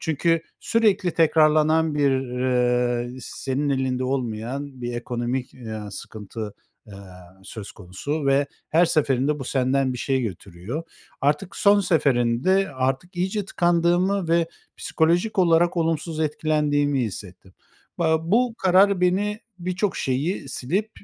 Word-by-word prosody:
çünkü 165 +1 +1 0.2
sürekli 205 -6 +2
tekrarlanan 155 0 +3
bir, 145 -2 +3
ııı, 125 -2 0
senin 135 +3 -3
elinde 130 -2 0
olmayan 130 +2 -3
bir 120 0 -3
ekonomik, 120 +1 -3
ııı, 110 -4 -7
sıkıntı, 105 +1 -7 0.3
eee, 105 - -13 0.5
söz 105 0 -8
konusu 140 - -4
ve 140 +1 +3 0.2
her 170 +3 +5
seferinde 145 -2 +1
bu 135 - -5
senden 130 0 +1
bir 125 - -6
şey 130 +1 0
götürüyor. 100 - -6 0.4
Artık 150 +7 0
son 205 0 +5
seferinde 150 +2 +2
artık 135 +7 -2
iyice 190 +3 -1
tıkandığımı 175 +1 +1
ve 165 0 +2 0.3
psikolojik 175 +6 0
olarak 175 -1 +3
olumsuz 165 -1 -1
etkilendiğimi 150 -2 +1
hissettim. 95 -3 -8 0.5
Ba 160 -1 +1
bu 240 +1 +3
karar 190 +1 +4
beni 205 +4 +1 0.2
birçok 185 +3 -2
şeyi 140 +5 -2
silip, 185 - -2
145 Hz, 120 wpm, -23 LUFS, 125-175 Hz, 0.5 s, her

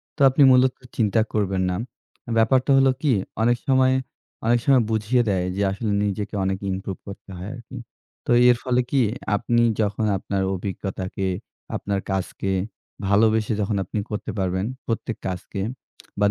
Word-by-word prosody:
তো 145 - -7
আপনি 130 +3 +1
মূলত 130 0 +5 0.2
চিন্তা 110 -1 +3
করবেন 100 -3 0
না। 90 - -1 0.6
ব্যাপারটা 125 +4 +3
হলো 135 0 +5
কি? 150 - +2 0.3
অনেক 120 +1 +3
সময় 130 -1 +4 0.5
অনেক 120 +1 +4
সময় 135 -4 +5
বুঝিয়ে 110 +3 +2
দেয় 95 -2 +1
যে 100 - -1
আসলে 105 +2 -2
নিজেকে 105 +1 -2
অনেক 95 0 0
ইমপ্রুভ 95 0 -4
করতে 100 0 -10
হয় 90 - -6
আরকি। 120 -2 -10 0.5
তো - - -1 0.2
এর 120 - +5
ফলে 125 -1 +2
কি? 140 - +3 0.3
আপনি 120 +3 +1 0.2
যখন 105 +1 0
আপনার 95 +1 -2
অভিজ্ঞতাকে, 95 0 -4 0.5
আপনার 100 -1 -2
কাজকে 95 0 -2 0.6
ভালোবেসে 110 +2 +3
যখন 105 +1 0
আপনি 105 +3 -4
করতে 105 - -4
পারবেন, 95 +1 0 0.2
প্রত্যেক 115 0 -2
কাজকে 95 +2 -4 0.6
বা 105 - +4
105 Hz, 150 wpm, -23 LUFS, 95-120 Hz, 0.6 s, মূলত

